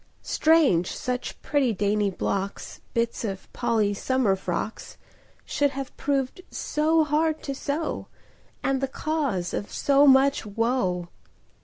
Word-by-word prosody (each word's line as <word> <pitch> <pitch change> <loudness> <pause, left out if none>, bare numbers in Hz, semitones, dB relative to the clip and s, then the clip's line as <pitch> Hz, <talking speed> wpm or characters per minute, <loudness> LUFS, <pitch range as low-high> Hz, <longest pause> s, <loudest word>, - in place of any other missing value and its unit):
Strange 295 - +3
such 250 0 -4
pretty, 280 -5 +2
dainty 205 +1 +1
blocks— 195 +1 -3
Bits 235 0 0
of 195 -4 -5
Polly's 220 -4 0
summer 260 -7 +2
frocks— 190 +3 -4 0.5
Should 285 0 +1
have 275 -1 -5
proved 275 +3 -1
so 315 +2 +1
hard 310 +1 0
to 275 - -3
sew, 290 +4 -3 0.6
And 270 -1 +1
the 270 - +1
cause 270 - -2
of 205 - -4
so 285 +1 +4
much 270 +1 +5
woe! 205 -5 -1
255 Hz, 125 wpm, -26 LUFS, 205-285 Hz, 0.6 s, much